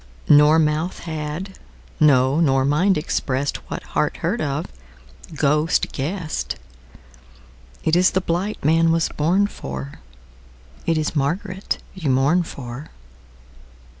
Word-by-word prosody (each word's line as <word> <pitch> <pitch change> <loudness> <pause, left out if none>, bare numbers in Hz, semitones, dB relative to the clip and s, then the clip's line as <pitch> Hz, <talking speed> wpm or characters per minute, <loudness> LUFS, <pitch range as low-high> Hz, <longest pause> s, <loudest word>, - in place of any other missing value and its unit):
Nor 150 +2 +7
mouth 155 +2 0
had, 160 +4 -5 0.4
no 140 -1 +4
nor 135 -5 +3
mind, 175 +8 +3
expressedWhat 140 -3 -2
heart - - 0
heard - - 0
of, 145 0 -2 0.7
ghost 150 +2 +1
guessed:It 160 +3 -3 1.4
ís 180 +2 +5
the 190 - +3
blight 180 +1 -2
man 165 +2 +4
was 165 0 +1
born 175 +7 +2
for, 70 - -7 0.9
It 165 -1 +2
is 155 0 -1
Margaret 175 +7 -1 0.2
you 170 -7 -3
mourn 135 +7 +3
for. 135 -3 -7
155 Hz, 105 wpm, -22 LUFS, 140-170 Hz, 1.4 s, Nor